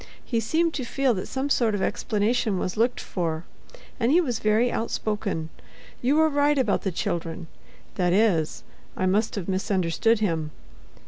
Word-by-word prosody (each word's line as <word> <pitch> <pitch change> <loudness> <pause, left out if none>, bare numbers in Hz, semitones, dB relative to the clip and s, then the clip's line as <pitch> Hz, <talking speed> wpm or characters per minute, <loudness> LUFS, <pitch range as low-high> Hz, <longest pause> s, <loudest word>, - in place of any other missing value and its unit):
He 230 - 0
seemed 320 +9 +1
to 265 - -3
feel 265 +1 +1
that 185 - -4
some 270 +2 -2
sort 225 -6 +2
of 200 - -2
explanation 215 0 0
was 180 - -2
looked 235 +3 +1
for, 165 -3 -3 0.6
and 235 +3 +2
he 335 - +6
was 250 -10 -1
very 220 +3 +2
outspoken. 210 -7 -2 0.5
You 260 +4 +2
were 315 0 +5
right 290 0 +2
about 245 -7 +2
the 190 - -1
children—that 170 +1 -4
is, 180 -6 +2 0.3
I 185 - 0
must 210 +4 +1
have 195 -5 -4
misunderstood 190 +2 +1
him. 165 -7 -1
215 Hz, 155 wpm, -25 LUFS, 185-245 Hz, 0.6 s, he